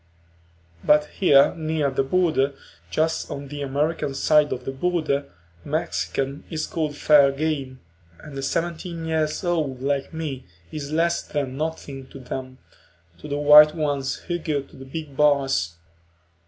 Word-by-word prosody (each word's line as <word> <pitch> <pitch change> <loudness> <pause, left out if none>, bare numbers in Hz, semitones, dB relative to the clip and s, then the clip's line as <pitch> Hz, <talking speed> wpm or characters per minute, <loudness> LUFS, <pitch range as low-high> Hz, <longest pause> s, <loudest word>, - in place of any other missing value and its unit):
But 150 0 +4
here 140 -7 +6
near 155 -3 -1
the 130 - +1
border, 140 -2 +1 0.3
just 160 +1 0
on 140 -1 -6
the 145 0 -6
American 140 +1 -1
side 150 +1 +3
of 125 - -4
the - - -2
border, 145 -2 -1 0.4
a - - -12
Mexican 135 +2 -2
is 160 -2 -2
called 155 -3 -3
fair 145 -2 +6
game, 140 -3 -3 0.4
and 150 -2 -11
a 135 - -4
seventeen 170 +2 -3
year 160 -1 +1 0.2
old 155 -7 -1
like 140 0 -1
me 150 - -5 0.2
is 145 -1 -6
less 165 +2 +1
than 140 -3 -3
nothing 140 -3 -5
to - - -12
them, 130 0 -6 0.6
to - - -9
the 145 0 -2
white 150 +1 +8
ones 145 -4 -1
who 175 -1 -4
go 150 -4 -2
to - - -19
the 135 - -11
big 145 +1 -7
bars. 135 - +2
145 Hz, 155 wpm, -24 LUFS, 135-160 Hz, 0.6 s, white